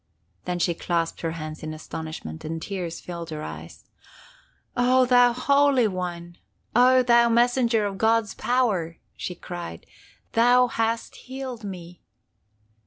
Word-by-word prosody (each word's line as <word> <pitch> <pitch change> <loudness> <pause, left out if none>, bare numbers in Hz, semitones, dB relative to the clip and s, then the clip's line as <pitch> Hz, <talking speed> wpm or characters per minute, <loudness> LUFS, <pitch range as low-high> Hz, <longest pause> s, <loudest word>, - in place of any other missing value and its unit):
Then 180 - -2
she 175 0 +1
clasped 170 0 -2
her 165 -1 -2
hands 155 -1 -7
in 155 0 -5
astonishment, 155 - -7
and 165 +1 -4
tears 175 -2 -5
filled 170 -1 -7
her 155 -1 -5
eyes. 80 +1 -9 0.9
'Oh, 255 +1 +4
thou 245 -1 +5
Holy 280 0 +3
One! 175 -2 -5 0.4
Oh, 255 +1 +6
thou 235 -1 +5
Messenger 235 -1 +3
of 195 -1 -4
God's 225 -1 +2
power!' 205 -10 0 0.2
she 180 - -5
cried. 175 - -8 0.5
Thou 245 +2 +5
hast 230 0 -1
healed 260 -3 -7
me! 180 -3 -8
200 Hz, 130 wpm, -25 LUFS, 170-245 Hz, 0.9 s, Oh